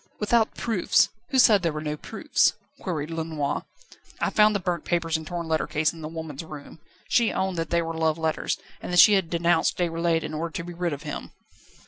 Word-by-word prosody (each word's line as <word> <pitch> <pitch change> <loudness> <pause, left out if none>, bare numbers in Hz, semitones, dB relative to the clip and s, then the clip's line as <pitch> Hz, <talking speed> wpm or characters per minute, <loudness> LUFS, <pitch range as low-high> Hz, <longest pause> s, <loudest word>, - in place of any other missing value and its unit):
"Without 220 +1 +2
proofs? 225 -7 +2 0.2
Who 270 - 0
said 215 -6 +6
there 170 -2 0
were 150 - -4
no 150 -1 -3
proofs?" - - +1 0.3
queried 160 -4 -4
Lenoir. 160 -3 -2 0.5
"I - - 0
found 215 0 +4
the - - +1
burnt 175 -3 -2
papers 170 -2 0
and 160 -1 -3
torn 170 -1 -4
letter 160 -1 0
case 155 +2 +1
in 165 - -11
the 155 - -5
woman's 160 -2 -6
room. 150 0 -10 0.3
She 235 -2 +3
owned 190 -1 -1
that 165 0 -2
they 170 0 +1
were 165 0 -4
love 160 -1 0
letters, 160 -1 -1 0.2
and - - -6
that 180 - 0
she 175 +5 +9
had 190 -4 +2
denounced 170 -1 +2
Déroulède 165 -1 0
in 155 0 -5
order 160 +1 -3
to 170 - -4
be 175 +1 -8
rid 175 0 -2
of 145 +1 -6
him." 150 - -6
165 Hz, 215 wpm, -25 LUFS, 160-180 Hz, 0.5 s, she